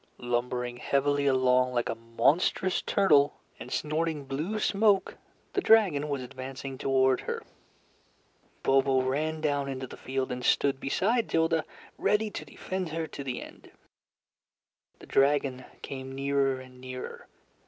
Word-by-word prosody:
Lumbering 120 0 -2
heavily 140 +2 +1
along 130 -1 +3
like 120 - +1
a - - -1
monstrous 115 +11 +1
turtle, 150 -8 +3 0.2
and - - -9
snorting 155 -1 -1
blue 155 +11 -3
smoke, 205 -2 +2 0.4
the 390 - +1
dragon 185 - +4
was 140 -3 -2
advancing 130 +1 -7
toward 130 -1 +3
her. - - -4 1.2
Bobo 135 -1 +3
ran 155 +4 -1
down 145 -2 0
into 130 -1 -4
the - - -10
field 130 0 -3
and 125 0 -4
stood 135 +1 +2
beside 220 - +1
Tilda, 165 0 +2 0.3
ready 210 0 +2
to - - -5
defend 185 -2 -5
her 165 +1 -2
to 140 - -7
the 130 -2 -4
end. - - -14 1.3
The - - -13
dragon 135 -2 +2 0.2
came 135 -1 -6
nearer 135 -1 +1
and 130 -1 -13
nearer. 130 0 -7
140 Hz, 135 wpm, -28 LUFS, 130-160 Hz, 1.3 s, dragon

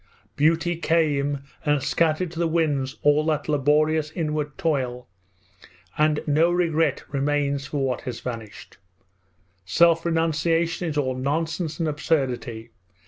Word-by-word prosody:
Beauty 165 +3 +2
came 145 -4 +1 0.2
and 145 -3 +1
scattered 165 +1 +1
to 170 - -7
the 170 - +2
winds 150 -5 0
all 145 +1 +4
that 150 -2 0
laborious 150 +1 +2
inward 150 -3 -3
toil, 130 -6 -1 0.9
and 150 0 +2
no 155 +3 +3
regret 165 -2 +1
remains 140 0 -1
for 140 -2 -1
what 130 -2 -2
has 120 -2 -6
vanished! 115 -4 -8 0.8
Self 165 - +3
renunciation 165 +1 0
is 150 - -4
all 130 -3 0
nonsense 160 +5 -2
and 165 - 0
absurdity! 125 -7 -2
150 Hz, 125 wpm, -24 LUFS, 140-165 Hz, 0.9 s, all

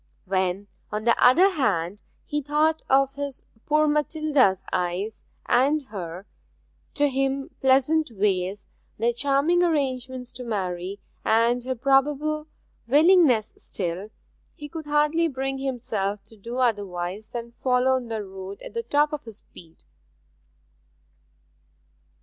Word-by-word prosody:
When, 190 +1 -1 0.2
on 210 +1 -3
the 235 +1 +4
other 345 +11 +6
hand, 205 - -1 0.2
he 295 0 -2
thought 305 +3 +1
of 270 0 +4
his 280 -1 -6 0.2
poor 305 0 +3
Matilda's 295 - +2
eyes, 180 +5 -2 0.2
and 280 +5 +3
her, 180 -2 -6 0.7
to 290 0 +3
him, 270 0 -1
pleasant 270 +4 +3
ways, 195 -2 -1 0.3
their 235 +2 +1
charming 285 +7 +2
arrangements 260 -6 -1
to 250 - -8
marry, 190 -3 -3 0.2
and 230 +2 +2
her 260 0 -2
probable 290 +4 +1 0.4
willingness 295 - +5
still, 185 +2 -5 0.5
he 295 - -8
could 315 0 -8
hardly 300 +3 +2
bring 270 -2 -3
himself 215 -7 -3
to 225 - -18
do 230 +4 -7
otherwise 205 -4 -1
than 235 -1 -6
follow 255 0 +3
on 260 -2 0
the 220 -2 -3
road 190 0 -8
at - - -9
the 465 - -1
top 295 -7 +1
of 295 - -5
his 225 -3 -10
speed. 165 - -17
255 Hz, 125 wpm, -25 LUFS, 205-290 Hz, 0.7 s, other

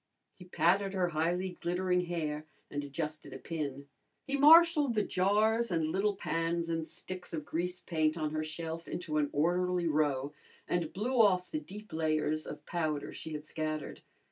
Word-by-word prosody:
He 180 - -14
patted 190 +3 +2
her 180 -2 +1
highly 175 +3 -1
glittering 180 +1 +1
hair 155 -3 -3 0.2
and 145 0 -3
adjusted 150 +2 -5
a - - -6
pin. 140 -4 -5 0.4
He 280 - -1
marshalled 300 -2 +7
the 210 - +3
jars 215 +5 +2
and 165 -3 0
little 200 +4 +1
pans 165 -2 -1
and 165 -1 -2
sticks 185 -2 -6
of 155 -2 -5
grease 180 +2 -3
paint 155 -1 0
on 155 -2 -1
her 155 0 -1
shelf 160 +1 -5
into 155 -3 -3
an 145 -1 +1
orderly 180 +3 +1
row 145 -2 +1 0.3
and 170 -3 -1
blew 235 +5 +2
off 185 -4 +3
the 310 - -1
deep 210 - -11
layers 155 -1 0
of - - -8
powder 155 -4 -2
she 160 - -7
had 150 0 -5
scattered. 155 -1 -4
170 Hz, 170 wpm, -32 LUFS, 155-185 Hz, 0.4 s, marshalled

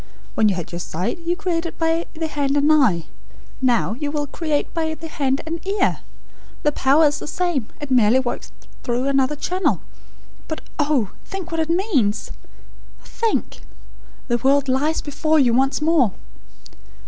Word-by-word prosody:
When 215 -1 +3
you 195 - +1
had 175 -2 -5
your 170 - -4
sight, 180 - -3
you 340 +1 -1
created 345 -3 -2
by 325 +1 0
the 320 +1 -2
hand 285 -2 0
and 290 +2 +4
EYE. 220 - +4 0.6
Now, 245 -4 +2
you 290 +5 -3
will 295 0 -1
create 300 0 -2
by 320 -1 -1
the 325 - -8
hand 275 -3 0
and 330 +1 -4
EAR. 400 +2 +1 0.6
The 295 - +3
power 285 +3 +4
is 290 0 +2
the - - -7
same. 320 -8 -1
It 290 -2 -6
merely 240 -1 +5
works 255 -2 -4 0.3
through 245 +1 -1
another 275 +1 +2
channel. 365 +5 0 0.7
But 315 - -4 0.2
oh, 285 -8 +1
think 380 -3 -6
what 330 - -1
it 320 - -2
means! 330 - +1 0.7
Think! 455 -1 -2 0.7
The 240 -2 +2
world 275 +2 +3
lies 285 +5 +1
before 310 +2 +1
you 255 -5 +4
once 270 +4 +2
more!" 305 - +4
290 Hz, 160 wpm, -21 LUFS, 260-325 Hz, 0.7 s, merely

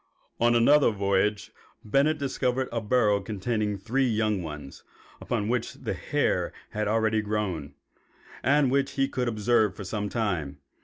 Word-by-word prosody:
On 120 0 +4
another 140 +5 +5
voyage 100 0 0 0.3
Bennett 140 +8 +2
discovered 130 -2 -1
a 115 - -2
burrow 105 -2 +2
containing 105 0 -2
three 125 +7 0
young 110 -3 0
ones, 75 -4 -8 0.4
upon 110 -4 -2
which 125 +1 -1
the - - -4
hair - - 0 0.2
had 105 0 -2
already 110 0 +2
grown, 100 -8 -3 0.7
and 140 -1 +3
which 135 0 +1
he 135 -1 +1
could 125 -2 -2
observe 110 -2 +2
for 100 - -7
some 105 +1 -3
time. 90 - -2
110 Hz, 145 wpm, -27 LUFS, 100-125 Hz, 0.7 s, another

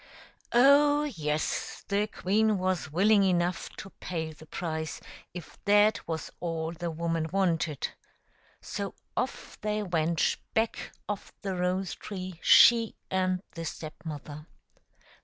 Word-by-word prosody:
Oh, 290 +4 +6
yes; 155 - -2
the 205 +1 +1
queen 215 +2 +1
was 185 -5 -1
willing 200 +5 +5
enough 180 -2 +1
to 195 - -9
pay 160 -3 -3
the 160 +1 -15
price, 160 -3 -4 0.3
if 175 -2 -10
that 205 +1 +4
was 160 -1 -4
all 165 -1 -2
the 170 0 -4
woman 165 0 -1
wanted. 170 -6 0 0.7
So 200 0 -5 0.2
off 255 - -3
they 210 0 -1
went 170 -3 +1 0.2
back 225 0 0 0.2
of 205 -1 -4
the 195 -2 -2
rose 180 +1 0
tree, 185 -4 -7
she 230 -2 +7 0.2
and 185 0 +1
the 165 - -6
Step 155 -1 -6
mother. 150 -1 -7
185 Hz, 125 wpm, -29 LUFS, 160-205 Hz, 0.7 s, she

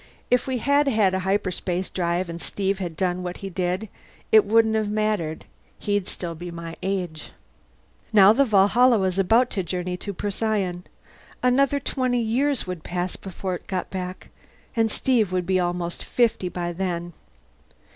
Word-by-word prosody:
If 250 +1 +3
we 260 -1 0
had 285 +4 +2
had 215 -7 +3
a 190 - +1
hyperspace 185 -1 -1
drive 175 0 -1
and 170 0 -6
Steve 195 0 -2
had 175 -4 -5
done 180 -1 0
what 180 0 -5
he 195 - -5
did, 180 +4 -1 0.4
it 215 -1 +7
wouldn't 220 +1 +4
have 215 -1 0
mattered. 210 -7 -1 0.3
He'd 205 -2 -1
still 170 -2 -4
be 175 +2 -7
my 170 -1 -7
age. 180 -5 -3 0.8
Now 205 -1 +7
the 275 +5 +4
Valhalla 230 +2 +5
was 190 -1 0
about 230 +6 +3
to 195 - -1
journey 180 +1 -3
to 200 - -5
Procyon. 200 -2 -2 0.6
Another 275 +3 +3
twenty 255 -2 -1
years 255 +4 0
would 180 -3 -5
pass 180 +1 -3
before 190 0 -5
it 180 - -7
got 185 -2 -3
back, 185 -1 -6 0.5
and 225 -1 +2
Steve 220 -4 +1
would 180 -1 0
be 185 +1 +2
almost 175 -1 -2
fifty 230 -6 +1
by 175 -1 -3
then. 175 -1 -3
190 Hz, 165 wpm, -24 LUFS, 180-220 Hz, 0.8 s, it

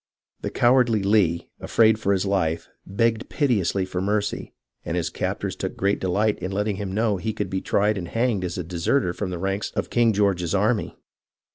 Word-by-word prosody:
The - - -2
cowardly 120 -4 +3
Lee, 95 -5 +2
afraid 110 -1 +3
for 100 -3 0
his 95 0 +1
life, 85 -5 0 0.2
begged 115 +3 0
piteously 100 - +1
for 90 -1 -3
mercy, 105 +1 -1 0.3
and - - -2
his - - -1
captors - - -3
took - - -5
great 100 +1 +1
delight 105 +3 +1
in 95 +2 -4
letting 105 0 -1
him 100 -1 -4
know 105 0 +1
he 110 +4 -3
could - - -4
be 95 0 -1
tried 105 0 +1
and 85 - -5
hanged 115 -2 0
as 90 -1 -3
a 90 - -2
de 85 +1 -7
serter 90 +1 +1
from 95 +1 -4
the 90 - -4
ranks 95 +3 -2
of - - -2
King 120 -1 +4
George's 100 -4 +1
army. 105 +3 0
100 Hz, 195 wpm, -24 LUFS, 95-110 Hz, 0.3 s, King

